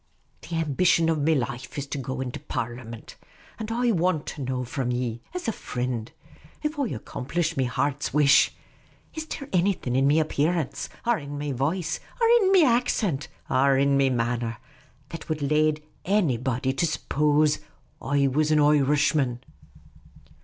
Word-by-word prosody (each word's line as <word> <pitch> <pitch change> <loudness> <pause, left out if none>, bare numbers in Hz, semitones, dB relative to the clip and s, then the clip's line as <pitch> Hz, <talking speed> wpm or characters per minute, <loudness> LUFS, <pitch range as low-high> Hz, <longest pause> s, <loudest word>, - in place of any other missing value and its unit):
The 170 - -6
ambition 165 +1 +2
of 160 -2 +1
me 155 +2 +2
life 130 +2 -4
is 140 - -2
to 140 0 -5
get 130 0 -4
into 130 -1 -4
Parlimint. 115 -1 -6 0.4
And 220 0 -4
I 240 +1 +2
want 175 -5 +1
to 145 - -8
know 130 -1 -2
from 125 0 -3
ye, 120 -2 -2
as 360 -7 -4
a - - +2
frind 125 - -4 0.3
— - - -25
if 300 0 -2
I 275 - +1
accomplish 160 - -3
me 130 - +1
heart's 145 +3 -1
wish 140 -2 +5 0.3
— - - -33
is 315 -1 -5
there 280 -3 -6
annything, 180 -9 +1
in 135 +1 +3
me 150 +3 +4
apparence, 155 0 -1 0.2
ar 240 -4 +2
in 145 0 -7
me 145 0 -3
voice, 155 +6 -1 0.2
ar 460 - +4
in 385 -1 +3
me 370 -5 +6
accent, 230 - +1 0.2
ar 135 +1 +3
in 140 +1 +3
me 135 -1 +3
manner, 120 -2 -1 0.5
that 165 0 -8
would 155 -2 -2
lade 155 +1 +2 0.2
annybody 130 - +1
to 170 - +2
suppose 150 -1 +1 0.4
I 140 0 +1
was 150 +3 +1
an 155 - +4
Oirishman 145 -3 +3
145 Hz, 165 wpm, -25 LUFS, 130-165 Hz, 0.5 s, me